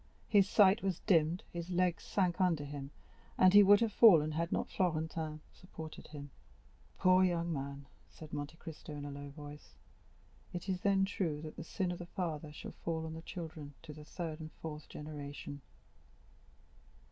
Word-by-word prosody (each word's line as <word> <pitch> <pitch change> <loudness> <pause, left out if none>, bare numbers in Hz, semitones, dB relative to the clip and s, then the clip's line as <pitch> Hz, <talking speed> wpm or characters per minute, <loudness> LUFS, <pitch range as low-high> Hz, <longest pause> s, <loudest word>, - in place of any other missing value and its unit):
His 200 -3 +5
sight 205 +1 +6
was 190 -3 -1
dimmed, 165 0 +3
his 170 0 -5
legs 180 -1 +1
sank 185 -2 0
under 170 -5 +2
him, 140 -1 -6 0.5
and 185 0 +6
he 205 - +10
would 205 +1 +7
have 225 -3 +1
fallen 165 -11 +7
had 165 +2 -1
not - - 0
Florentin 160 -3 -1
supported 160 -4 -10
him. 145 -2 -9 0.7
"Poor 185 0 +5
young 170 -2 +1
man," 140 0 -5 0.2
said 155 -1 -12
Monte 145 +2 -4
Cristo 160 -2 -9
in 145 -1 -6
a 145 - -5
low 140 0 -7
voice; 145 0 -11 0.8
"it 175 +1 -5
is 185 -2 -1
then 195 -1 +3
true 175 -6 -2
that 155 - -7
the - - -6
sin 180 +2 -2
of 175 - -5
the 175 - -7
father 160 -5 -4
shall 150 - -8
fall 160 -1 -2
on 160 - -5
the 160 - -7
children 160 -5 -7
to 155 -2 -8
the 150 0 -11
third 160 0 -5
and 155 0 -7
fourth 155 -2 -8
generation." 145 -1 -7
160 Hz, 175 wpm, -34 LUFS, 150-185 Hz, 0.8 s, he